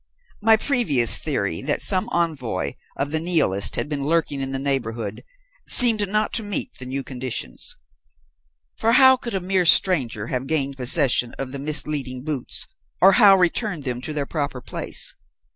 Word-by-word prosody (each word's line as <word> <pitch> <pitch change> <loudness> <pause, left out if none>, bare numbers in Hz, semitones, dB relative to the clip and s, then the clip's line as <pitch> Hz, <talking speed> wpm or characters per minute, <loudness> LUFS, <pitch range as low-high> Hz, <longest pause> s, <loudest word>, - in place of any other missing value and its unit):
My 220 +1 +4
previous 215 - +1
theory, 100 - -3
that 145 +1 -1
some 185 -2 +3
envoy 145 - -2 0.3
of 140 +1 -3
the 160 - -1
Nihilists 155 - +2
had - - -3
been 145 -2 -4
lurking 150 -2 -1
in 135 0 -3
the 135 - -2
neighbourhood, 120 -6 -4 0.4
seemed 220 -5 +5
not 215 +1 -1
to 230 - 0
meet 205 +4 -4
the 130 - -7
new 135 +1 -3
conditions. 125 - -6 1.0
For 225 +1 +1
how 260 +1 +7
could 235 -4 -6
a - - 0
mere 185 -1 0
stranger 130 - +2
have 130 +2 -4
gained 140 -3 -1
possession 130 -2 +2
of 135 -1 -5
the 140 - -6
misleading 140 -3 -1
boots, 150 -4 -1 0.3
or 195 - +6
how 200 -2 +6
returned 180 -2 -1
them 125 -2 -4
to 155 - -6
their 145 -2 -3
proper 140 -4 -4
place? - - -4
145 Hz, 165 wpm, -22 LUFS, 130-185 Hz, 1.0 s, how